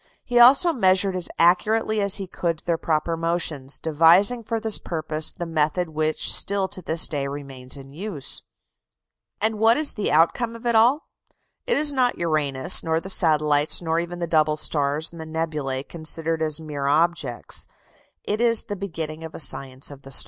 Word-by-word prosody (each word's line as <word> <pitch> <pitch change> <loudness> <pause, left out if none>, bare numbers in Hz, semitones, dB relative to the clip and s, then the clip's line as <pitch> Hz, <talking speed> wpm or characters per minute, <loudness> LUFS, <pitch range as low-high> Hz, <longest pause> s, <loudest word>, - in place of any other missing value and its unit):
He 245 0 0
also 275 +8 +6
measured 190 -4 +1
as 180 -2 -2
accurately 215 +5 +2
as 200 -1 +2
he 195 - +1
could 170 -3 -4
their 170 - 0
proper 160 +1 -1
motions, 165 -5 -2
devising 170 +10 +3
for 225 +1 -3
this 220 -1 +3
purpose 155 -2 -2
the 175 - -7
method 160 +2 -1
which 155 0 -1
still 200 -1 0
to 185 - -8
this 160 -1 0
day 140 -2 -3
remains 135 -2 -6
in 135 0 -13
use. 175 -4 -1 1.0
And 220 0 -1
what 225 +2 +4
is 305 -1 +4
the 210 - -3
outcome 225 +9 +1
of 230 +1 -13
it 235 - +1
all? 240 +8 +3 0.6
It 480 - +1
is 295 -1 +2
not 255 -2 0
Uranus, 155 -3 +2
nor 160 -1 -1
the 190 - -9
satellites, 150 -3 +4
nor 165 -1 -2
even 175 +1 -6
the 175 - -3
double 155 -2 +1
stars 145 0 -1
and 170 -1 -11
the - - -8
nebulæ 155 -4 -4
considered 165 0 0
as 155 -1 +2
mere 145 -3 -5
objects: 150 -4 -1 0.6
it 210 +2 -3
is 230 -2 +4
the 205 -3 -6
beginning 160 -5 -7
of 160 - -9
a - - -8
science 135 -2 0
of 140 -1 -13
the 135 - -13
stars. 135 - +3
165 Hz, 185 wpm, -22 LUFS, 150-200 Hz, 1.0 s, also